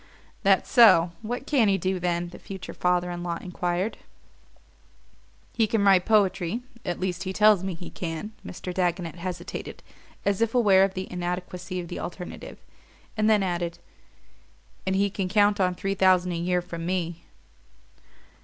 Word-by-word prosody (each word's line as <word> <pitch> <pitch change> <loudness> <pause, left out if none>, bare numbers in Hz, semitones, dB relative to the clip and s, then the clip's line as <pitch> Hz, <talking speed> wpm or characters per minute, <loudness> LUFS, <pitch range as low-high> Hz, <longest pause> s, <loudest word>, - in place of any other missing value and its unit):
"That 195 -2 +4
so? 185 -9 +6
What 240 +4 -4
can 270 -7 +3
he 195 -1 +3
do, 185 +1 -1
then?" 175 0 -1
the 175 - -12
future 190 -2 -8
father 180 0 +1
in 175 0 -5
law 170 -1 -3
enquired. 180 +3 -2 1.5
"He 225 -2 +2
can 215 -1 +1
write 190 -2 +5
poetry 205 0 +2 0.2
at 175 -5 -3
least 185 -1 -2
he 190 -1 -3
tells 210 -1 +4
me 190 -2 -3
he 175 +1 -9
can." 170 +4 -5
Mr. 180 0 -6
Dagonet 175 -2 -1
hesitated, 175 0 -6 0.4
as 200 +1 +1
if 230 +1 +1
aware 200 -6 +5
of 195 -1 0
the 185 0 -3
inadequacy 180 0 -4
of 175 - -6
the 175 - -6
alternative, 180 0 -7 0.6
and 215 0 +2
then 210 -2 +4
added: 175 -2 -2 1.1
"And 190 - +1
he 200 +1 +2
can 190 -2 -2
count 205 +1 +3
on 180 -1 +2
three 195 +2 -2
thousand 185 -2 +3
a - - -2
year 175 +1 0
from 170 -2 -7
me." 170 -1 -2
185 Hz, 165 wpm, -26 LUFS, 175-200 Hz, 1.5 s, so